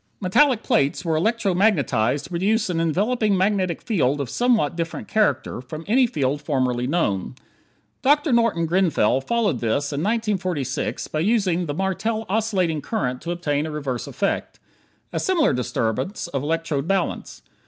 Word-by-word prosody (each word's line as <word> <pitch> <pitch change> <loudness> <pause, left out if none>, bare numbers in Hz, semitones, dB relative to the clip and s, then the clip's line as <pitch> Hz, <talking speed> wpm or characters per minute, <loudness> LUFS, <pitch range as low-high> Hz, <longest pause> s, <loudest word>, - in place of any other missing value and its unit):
Metallic 230 +5 +3
plates 140 +6 +1
were 165 -1 +1
electro 215 +3 +1
magnetized 145 - +2
to - - -10
produce 195 +4 +1
an 165 - -1
enveloping 205 +5 +1
magnetic 190 -2 0
field 145 - +1
of 135 -3 -3
somewhat 240 - +2
a - - -13
different 165 -1 -4
character 215 - 0
from 155 +5 -8
any 250 +4 +4
field 145 - -1
formerly 130 -4 0
known. 125 - -1 0.7
Dr. 295 +2 +3
Norton 230 -8 +2
Grenfell 160 - +2
followed 230 - 0
this 140 +6 -1
in 140 - -2
1946 185 - -1
by 155 - -2
using 185 -3 +1
the 145 - -3
Martel 215 +5 -1
oscillating 190 -7 0
current 130 - -2
to 170 - -6
obtain 155 -4 -1
a - - -5
reverse 140 -5 -4
effect. - - -2 0.5
A - - -1
similar 345 - +2
disturbance 125 - -2
of 135 -5 -2
electrode 160 -1 -1
balance. 195 -2 -2
170 Hz, 155 wpm, -23 LUFS, 145-215 Hz, 0.7 s, any